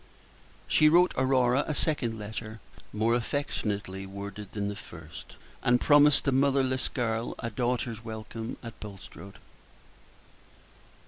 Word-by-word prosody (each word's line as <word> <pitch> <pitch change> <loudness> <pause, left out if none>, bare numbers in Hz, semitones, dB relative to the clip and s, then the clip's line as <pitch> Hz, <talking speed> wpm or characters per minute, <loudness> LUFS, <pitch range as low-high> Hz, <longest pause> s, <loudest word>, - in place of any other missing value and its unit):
She 155 - +5
wrote 175 +3 +5
Aurora 130 0 +3
a 150 - -1
second 125 -9 0
letter, 110 +1 -6 0.3
more 110 +2 +1
affectionately 105 -7 -2
worded 100 +1 -7
than 100 -1 -2
the 105 - -3
first, 80 -6 -11 0.3
and 125 0 +3
promised 145 0 +5
the 140 - +1
motherless 135 -1 +2
girl 115 -1 -2
a 115 - -4
daughter's 120 -3 -2
welcome 110 0 -6
at 115 -1 -9
Bulstrode. 100 -2 -10
115 Hz, 120 wpm, -28 LUFS, 105-130 Hz, 0.3 s, She